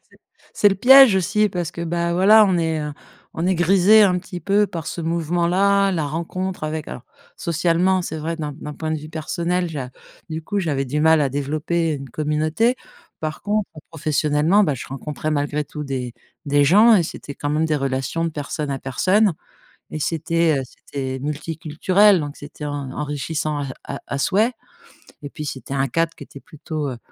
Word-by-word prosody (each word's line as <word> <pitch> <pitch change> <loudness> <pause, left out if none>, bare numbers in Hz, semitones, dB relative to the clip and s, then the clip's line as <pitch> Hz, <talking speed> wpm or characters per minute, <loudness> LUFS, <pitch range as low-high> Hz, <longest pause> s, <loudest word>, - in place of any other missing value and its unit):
C'est - - -24 0.4
c'est 205 - +5
le 195 - 0
piège 265 +2 +8
aussi 210 +3 +2
parce 175 -4 -3
que, 170 - -6
bah, 170 0 -1
voilà, 210 +4 +7
on 185 -4 +1
est, 160 -1 0
heu, 150 0 -4 0.4
on 165 +2 -2
est 190 - +2
grisé 195 +5 +5
un 180 -3 +3
petit 180 -1 -8
peu 205 +1 +2
par 165 -5 -6
ce - - -5
mouvement-là, 175 +4 +1
la 160 -4 -1
rencontre 170 +4 -4
avec, 155 0 -4
alors, 125 - -8 0.3
socialement, 175 +3 +1
c'est 160 - -5
vrai 165 +2 -3
d'un 150 -2 -4
d'un 150 0 -8
point 160 -1 -4
de 155 - -1
vue 155 +1 -10
personnel, 170 +3 -2
j'a 135 -5 -5 0.4
du 160 0 -4
coup, 205 +5 -3
j'avais 145 -7 -1
du 145 +4 -2
mal 160 0 +5
à 140 - +2
développer 155 +4 -1
une 135 -2 -7
communauté. 155 - 0 0.5
Par 155 0 -4
contre, 210 0 -1 0.2
professionnellement, 155 +4 +2
bah, 150 -6 0
je 120 - -7
rencontrais 150 +3 -5
malgré 145 0 -1
tout 150 +1 -7
des 130 -3 -4 0.3
des 145 0 +3
gens 215 +9 +6
et 175 - +3
c'était 140 -2 -8
quand 145 - -3
même 155 +2 +1
des 155 - +1
relations 135 +4 -2
de 165 - -1
personne 150 0 -4
à 135 - -2
personne 185 - +2 0.6
et 155 - -4
c'était, 165 -1 +1
heu, - - -3
c'était 130 0 -6
multiculturel 165 +6 +2
donc 145 0 -6
c'était 145 +1 -9
en 145 -2 -4
enrichissant 150 +1 -3
à 140 - -3 0.2
à 140 - -5
à 140 - -3
souhait 215 - +2 0.7
et 145 - -6
puis, 150 - -7
c'était 135 -1 -6
un 135 0 +1
cadre 165 +5 0
qui - - -10
était 140 - -13
plutôt, 155 -1 -5
heu, 125 - -6
160 Hz, 195 wpm, -21 LUFS, 145-180 Hz, 0.7 s, piège